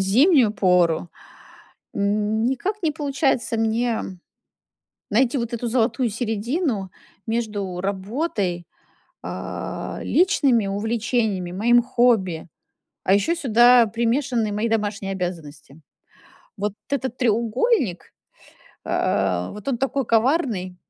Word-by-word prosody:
зимнюю 240 - +4
пору. 180 -4 +2 0.9
М, 210 +2 0
никак 370 - -2
не 315 - +1
получается 275 -5 0
мне 225 +1 0 1.1
найти 250 +4 +2
вот 235 -1 -3
эту 235 +1 -3
золотую 240 +1 +1
середину 225 - -2 0.4
между 205 -5 -3
работой, 195 - -2 0.6
а, - - -5
личными 275 - +2
увлечениями, 215 -2 -1
моим 240 +5 +3
хобби, 225 -10 +1 0.6
а 190 - +4
ещё 205 +12 +2
сюда 240 -3 +5
примешаны 235 0 0
мои 215 +3 -1
домашние 205 -3 -2
обязанности. 160 -5 -6 0.8
Вот 205 0 -2 0.2
этот 260 -3 -2
треугольник, 235 - 0 0.7
а, 90 0 0
а, - - -8
вот 210 -1 -11
он 260 -4 0
такой 270 +1 -1
коварный, 225 - +1
225 Hz, 100 wpm, -22 LUFS, 195-250 Hz, 1.1 s, сюда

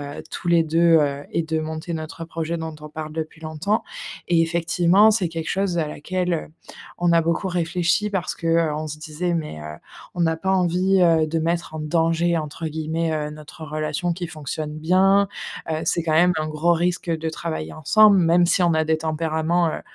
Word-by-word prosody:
heu, 145 0 -7
tous 175 - -5
les 170 -1 +5
2, 165 +1 +4
heu 140 -1 -1
et 170 - +1
de 160 0 -2
monter 160 +2 -5
notre 160 +1 -6
projet 165 0 -3
dont 160 -1 -5
on 150 - -9
parle 155 0 -6
depuis 160 0 -6
longtemps» 160 +7 -1 0.4
et 165 -1 +4
effectivement, 170 +5 +3
c'est 190 -6 +1
quelque 165 0 -5
chose 195 -3 0
à 155 - +1
laquelle, 180 +4 -2
heu, 160 - -3 0.5
on 175 0 +2
a 165 -1 +4
beaucoup 170 +4 -1
réfléchi. 175 +3 0
Parce 185 -3 -2
que, 165 - -6
heu, 165 -2 +2
on 155 +1 -3
se 150 +1 -6
disait: 165 +3 -3
«Mais 150 - -4
heu, 75 0 -8 0.4
on 175 -2 +1
a 160 - 0
pas 190 +4 -2
envie, 185 +1 +2
heu, 165 -2 +4
de 165 +1 -1
mettre 170 0 -2
en 155 - -4
«danger» 165 +2 +1
entre 155 +1 -5
guillemets, 160 +1 -2
heu, 150 -1 -2
notre 155 +2 -10
relation 155 +3 -2
qui 175 0 -4
fonctionne 155 0 -5
bien». 190 +5 +4 0.4
Heu, 155 0 -1
c'est 170 - +1
quand 160 - 0
même 175 +3 +5
un 155 0 -2
gros 155 +3 +1
risque 175 0 -1
de 160 0 -1
travailler 80 - -5
ensemble. 200 +6 +5
Même 170 0 +4
si 180 - +3
on 170 -2 +3
a 160 0 +2
des 160 0 +1
tempéraments, 160 +2 0
heu, - - -5
165 Hz, 210 wpm, -22 LUFS, 155-175 Hz, 0.5 s, les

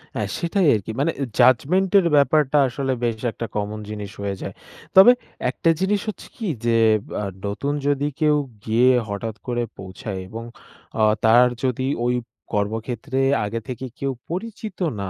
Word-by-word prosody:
হ্যাঁ, 105 -3 -2
সেটাই 170 +1 +1
আরকি। 105 +1 -4
মানে 155 +4 +2
অ্যা 140 - 0
judgment 180 +10 +4
এর 185 - 0
ব্যাপারটা 150 0 +3
আসলে 135 +1 -2
বেশ 115 -2 0
একটা 115 - -5
কমন 105 +1 -2
জিনিস 105 -2 -6
হয়ে 100 -1 -2
যায়। - - -5 0.4
তবে 195 +6 +10 0.4
একটা 150 +6 0
জিনিস 195 +2 +1
হচ্ছে 215 - -7
কি 225 -5 -4 0.2
যে 115 -1 +3 0.5
আ - - -3 0.2
নতুন 120 +8 -2
যদি 145 0 +1
কেউ 150 -1 +4 0.3
গিয়ে 115 +3 +4 0.2
হঠাৎ 105 +2 -4
করে 120 -1 0
পৌঁছায় 95 +2 -7
এবং 115 +4 -7 0.6
আ - - +5 0.2
তার 120 +3 +6 0.2
যদি 130 0 0 0.2
ওই 125 0 +2 0.4
কর্মক্ষেত্রে 115 +6 -2 0.3
আগে 115 +3 -3
থেকে 130 0 -5
কেউ 140 0 -1 0.2
পরিচিত 210 +3 -5 0.2
না 100 - -3
125 Hz, 160 wpm, -22 LUFS, 110-150 Hz, 0.6 s, তবে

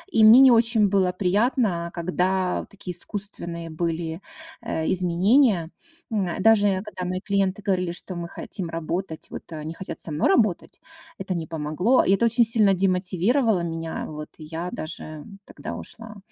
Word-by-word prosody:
И 220 - +5
мне 225 +4 +9
не 265 -2 +8
очень 225 -3 +4
было 190 -2 +2
приятно, 200 -3 +1
когда 180 +1 -1
такие 195 -2 -8
искусственные 170 -5 -5
были, 165 0 -3 0.4
э, 160 0 -2
изменения. 185 - +3 0.4
М, 195 -5 0
даже, 205 -2 +4
когда 185 -3 -6
мои 185 0 -2
клиенты 195 0 0
говорили, 180 -3 0
что: 185 +1 -6
"Мы 170 0 -5
хотим 175 0 -5
работать", 165 +1 -4
вот, - - -9
они 155 +1 -6
хотят 190 - -7
со 160 - -4
мной 150 - +1
работать, 215 - +1 0.4
это 190 -1 -3
не 160 -2 -4
помогло. 165 - +1
И - - 0
это 235 +4 +2
очень 230 +1 +4
сильно 215 -3 +5
демотивировало 190 +4 +1
меня. 165 -1 -4
Вот, 150 0 -8
и 155 - -11
я 165 +3 -5
даже 155 -1 -7 0.2
тогда - - -8
ушла. 220 -2 -10
185 Hz, 160 wpm, -24 LUFS, 170-210 Hz, 0.4 s, мне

